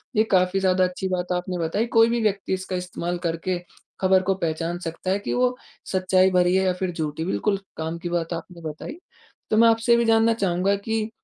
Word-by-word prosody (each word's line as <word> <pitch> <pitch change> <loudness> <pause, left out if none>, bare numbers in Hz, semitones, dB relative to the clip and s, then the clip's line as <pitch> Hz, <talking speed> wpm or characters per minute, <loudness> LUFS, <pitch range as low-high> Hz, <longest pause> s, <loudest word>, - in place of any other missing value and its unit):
ये 215 - +5
काफ़ी 185 0 +3
ज़्यादा 185 -1 +2
अच्छी 180 +1 -2
बात 180 0 -2
आपने 180 0 -3
बताई 170 +8 0
कोई 225 +1 +7
भी 235 0 0
व्यक्ति 200 -3 0
इसका 185 0 -3
इस्तेमाल 180 -1 -3
करके 165 +2 -2 0.4
खबर 190 0 +4
को 195 +1 +1
पहचान 165 0 -2
सकता 175 +2 -4
है 200 - +1
कि - - -3
वो 250 0 +2 0.4
सच्चाई 185 0 +3
भरी 180 0 +3
है 190 - +3
या 185 - +2
फिर 185 -1 -1
झूठी 160 -1 -3
बिल्कुल 195 +2 0 0.2
काम 160 +1 -3
की 175 - -5
बात 170 0 -2
आपने 170 0 -8
बताई। 155 - -8 0.5
तो 215 - +2
मैं 230 - +7
आपसे 225 +1 +2
ये 235 - +7
भी 235 - +2
जानना 225 0 +4
चाहूँगा 195 -1 +1
कि 220 +2 -2
185 Hz, 215 wpm, -24 LUFS, 175-205 Hz, 0.5 s, कोई